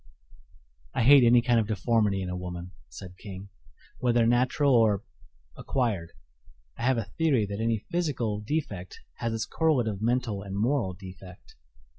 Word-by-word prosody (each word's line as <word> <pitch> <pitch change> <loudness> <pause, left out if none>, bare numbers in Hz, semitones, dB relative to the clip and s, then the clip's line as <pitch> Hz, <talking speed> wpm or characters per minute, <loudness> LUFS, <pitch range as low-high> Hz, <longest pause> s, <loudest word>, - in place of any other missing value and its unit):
"I - - +1
hate 140 +2 +8
any 120 0 +5
kind 120 -1 +3
of 110 - 0
deformity 105 -2 +1
in 90 - -4
a - - -3
woman," 90 0 -6 0.2
said 90 +9 -11
King, 95 -1 -9 0.5
"whether 120 -2 +2
natural 130 +4 +2
or 110 -4 +3 0.5
acquired. 105 -11 -2 0.6
I - - -10
have 130 +1 +2
a 110 -2 -4
theory 140 -10 +3
that 100 0 -6
any 115 -2 -1
physical 135 - -1
defect 105 - -4 0.2
has 115 - -2
its 115 -1 -2
correlative 125 - 0
mental 115 -3 0
and 100 0 -6
moral 110 -4 0
defect." 95 0 -12
110 Hz, 150 wpm, -27 LUFS, 95-125 Hz, 0.6 s, hate